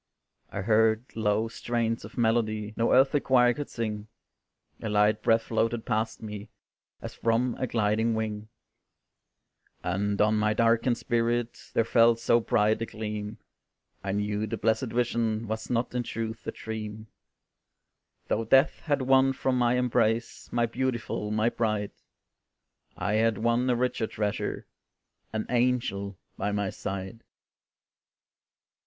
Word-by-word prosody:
I 100 - -4
heard 110 +2 +3
low 110 0 +1
strains 115 0 -2
of 105 - -11
melody 110 -2 +1
No 115 - +1
earthly 135 +3 +5
choir 125 -3 +4
could 145 +3 -6
sing, 110 -2 -4 0.7
A 110 - -3
light 105 +1 +3
breath 115 +1 +3
floated 115 0 -1
past 110 +1 -1
me, 105 -1 -7 0.5
As - - -6
from 115 +2 +1
a 130 - -1
gliding 110 0 +1
wing; 110 -1 -3 1.4
And 100 +3 -1
on 110 +1 +3
my 105 0 +1
darkened 115 +2 +3
spirit 120 0 -1
There 115 - +3
fell 115 0 +5
so 115 +1 +3
bright 110 -1 +2
a 115 - -2
gleam, 105 -1 -5 0.7
I 95 0 -2
knew 105 +1 -1
the - - -3
blessed 115 +4 +1
vision 115 -2 0
Was 110 +1 -4
not 120 0 0
in 125 - 0
truth 115 -1 -5
a - - -1
dream; 110 -1 -6 1.2
Though 115 - 0
death 135 +6 +4
had 145 -4 0
won 135 +1 +4
from 130 0 0
my 120 -1 +3
embrace, 115 -2 0
My 120 0 +2
beautiful, 115 -3 -2
my 110 +2 +2
bride, 110 -4 -1 1.1
I 100 - -1
had 110 0 +2
won 120 +3 +1
a 125 - +3
richer 125 -2 0
treasure, 105 -1 -3 0.7
An 110 -1 -2
angel 120 -6 0 0.2
by 100 +1 -1
my 100 -1 -1
side. 95 +4 -6
115 Hz, 135 wpm, -28 LUFS, 105-120 Hz, 1.4 s, earthly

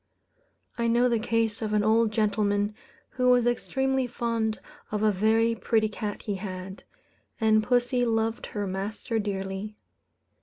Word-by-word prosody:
I 235 - +1
know 240 +2 +4
the 235 -2 +1
case 225 -1 0
of 215 -1 -2
an 210 -1 +3
old 220 +1 +3
gentleman, 205 -1 +1 0.4
who 250 -1 +1
was 245 -1 +5
extremely 265 +2 0
fond 230 -2 -1 0.3
of 210 0 -1
a 215 - +4
very 220 +4 +2
pretty 220 -1 +1
cat 210 -1 -5
he 205 -2 -2
had; 190 -1 -6 0.6
and 220 -1 +4
pussy 245 +2 +1
loved 225 -1 0
her 205 -1 -3
master 205 +4 -3
dearly. 195 0 -4
220 Hz, 145 wpm, -27 LUFS, 205-235 Hz, 0.6 s, was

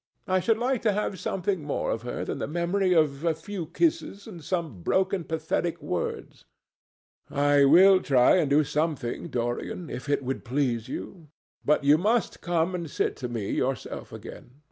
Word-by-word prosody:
I 185 0 +2
should 225 +4 +2
like 250 +1 0
to 215 -3 +2
have 200 -2 -2
something 190 -1 -1
more 145 -1 -2
of 115 - -2
her 120 +1 -4
than - - -4
the - - -2
memory 175 +4 0
of 155 -4 +2
a 165 -2 +1
few 170 +1 -6
kisses 200 - -1
and 175 -8 -10
some 160 - -3
broken 190 - +1
pathetic 160 +1 -2
words." - - -4 0.9
"I 145 0 +4
will 185 +6 +7
try 130 +4 +4
and 155 -6 +1
do 145 +2 +4
something, 150 -2 -2
Dorian, 120 +6 -3
if 135 - -6
it 145 -1 +1
would 130 +1 -3
please 120 -3 -1
you. 170 -5 -7 0.4
But 150 -1 +2
you 145 +2 +5
must 220 +5 0
come 170 0 0
and 170 -3 -4
sit - - -1
to 125 - -5
me 115 -4 -3
yourself 130 0 -3
again. 125 - -11
160 Hz, 175 wpm, -27 LUFS, 140-185 Hz, 0.9 s, will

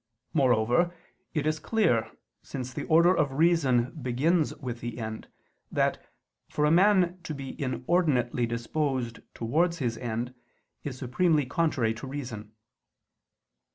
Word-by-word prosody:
Moreover, 130 +5 +3 0.4
it 150 - 0
is 155 0 0
clear, 160 - +1 0.3
since 130 -2 -6
the - - -4
order 170 +3 +5
of 145 -4 +1
reason 135 -6 +3
begins 145 +7 +1
with 125 -5 -6
the 120 -1 -5
end, 110 -1 -5 0.4
that, - - 0 0.5
for 150 - +1
a 150 - +3
man 185 0 +4
to 155 -2 -5
be 135 -1 -7
inordinately 130 -3 +1
disposed 120 +1 -2 0.2
towards 165 +9 +1
his 120 -6 -2
end, 120 +1 -3 0.5
is 135 -3 -5
supremely 145 +4 +2
contrary 130 -6 +1
to 120 +4 -8
reason. 120 -6 -6
135 Hz, 125 wpm, -28 LUFS, 120-160 Hz, 0.5 s, order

